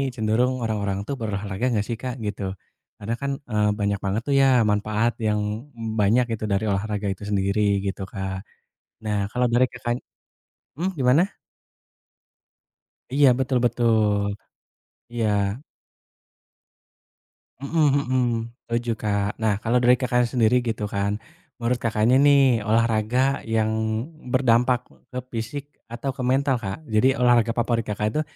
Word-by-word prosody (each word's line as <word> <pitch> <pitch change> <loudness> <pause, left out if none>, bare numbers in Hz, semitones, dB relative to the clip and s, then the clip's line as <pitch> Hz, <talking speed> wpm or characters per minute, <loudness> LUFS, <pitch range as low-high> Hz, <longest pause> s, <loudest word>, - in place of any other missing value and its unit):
cenderung 120 +3 +1
orang-orang 100 -3 -1
tuh 140 - -2
berolahraga 105 0 -3
nggak 105 -2 0
sih 120 - -2
Kak, 125 -1 -4
gitu. 105 -1 -4 0.6
Karena 110 +3 -3
kan, 140 0 -1 0.2
eee, 105 -1 +2
banyak 100 -1 0
banget 100 +3 -1
tuh 140 - +2
ya 135 - +5 0.3
manfaat 110 +3 +1 0.2
yang, 105 0 +1 0.3
mmm, 115 -2 -5
banyak 110 +5 +4
gitu 110 - -9
dari 100 +2 +1
olahraga 105 +1 -2
itu 95 - -13
sendiri, 100 +1 +1 0.3
gitu 95 +1 -4
Kak. 95 -1 -4 0.6
Nah, 105 - 0
kalau 125 +1 +1
dari 125 +2 +4
Kakakny 120 0 -3 0.8
mmm, 185 +2 -1
gimana? 130 +5 +4 1.9
Iya, 140 -1 +5
betul 130 -1 +1
betul. 110 -3 +2 0.9
Iya. 115 -2 0 2.3
Mhm 150 +2 +1 0.2
mhm. 130 0 +2 0.5
Setuju 120 0 -1
Kak. 100 -2 -1
Nah, 105 -2 +1
kalau 115 +3 +1
dari 125 +1 +5
Kakak 125 -1 +2
sendiri 125 0 +3
gitu 110 -3 -2
kan, 100 +1 -1 0.4
menurut 120 +1 +1
Kakaknya 115 +2 +2
nih 135 -6 +5
olahraga 115 +4 +1
yang 110 -1 0 0.6
berdampak 125 -1 +2 0.2
ke 125 - -3
fisik 120 +5 -4 0.3
atau 125 +3 -4
ke 130 - -4
mental 135 +2 +2
Kak? 95 +4 -4
Jadi 115 +4 +3
olahraga 120 -2 +4
favorit 120 0 0
Kakak 105 0 -2
itu 155 - +2
115 Hz, 135 wpm, -24 LUFS, 105-125 Hz, 2.3 s, ya